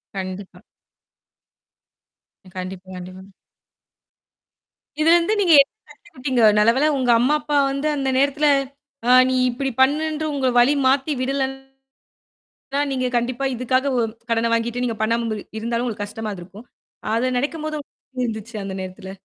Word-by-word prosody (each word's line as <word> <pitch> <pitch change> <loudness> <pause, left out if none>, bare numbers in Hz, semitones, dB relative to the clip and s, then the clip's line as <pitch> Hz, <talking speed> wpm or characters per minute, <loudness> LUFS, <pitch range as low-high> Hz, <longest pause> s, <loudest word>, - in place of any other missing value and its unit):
கண்டிப்பா. 190 0 -7 2.0
கண்டிப்பா, 185 0 -7
கண்டிப்பா. 185 +2 -10 1.7
இதுலருந்து 335 +5 +4
நீங்க 345 -4 +4
என்ன 275 - -2 0.2
கத்துக்கிட்டீங்க? 260 -4 -3 0.2
நல்லவேல 240 +8 +4
உங்க 255 -2 -1
அம்மா, 260 +5 +2
அப்பா 295 -1 -1
வந்து 275 +2 -2
அந்த 270 -1 -1
நேரத்துல 285 +2 +2 0.6
ஆ - - +6 0.2
நீ 260 - +1
இப்படி 270 +3 -2
பண்ணுன்று 310 +3 +1
உங்க 265 -2 0
வழி 260 +4 +5
மாத்தி 270 +3 +2
விடலன்னது 270 0 -2 1.1
தான், 285 0 +1
நீங்க 255 -1 -1
கண்டிப்பா 245 +3 -1
இதுக்காக 255 +3 0
ஒ - - +3 0.3
கடன 230 0 +1
வாங்கிட்டு 235 +2 -1
நீங்க 230 -2 -2
பண்ணாம 230 +1 +1
இருந்த் 215 -2 -5
இருந்தாலும் 235 +2 -2
உங்களுக்கு 210 -3 -3
கஷ்டமா 215 +1 -6
இருந்துருக்கும். 195 +5 -11 0.5
அது 235 +3 +1
நனைக்கும்போது 310 +2 -3
உங்களுக்கு - - -18
எப்டி 250 -1 -1
இருந்துச்சு 220 0 -6
அந்த 195 -1 -5
நேரத்துல? 185 +1 -8
250 Hz, 135 wpm, -21 LUFS, 220-280 Hz, 2.0 s, ஆ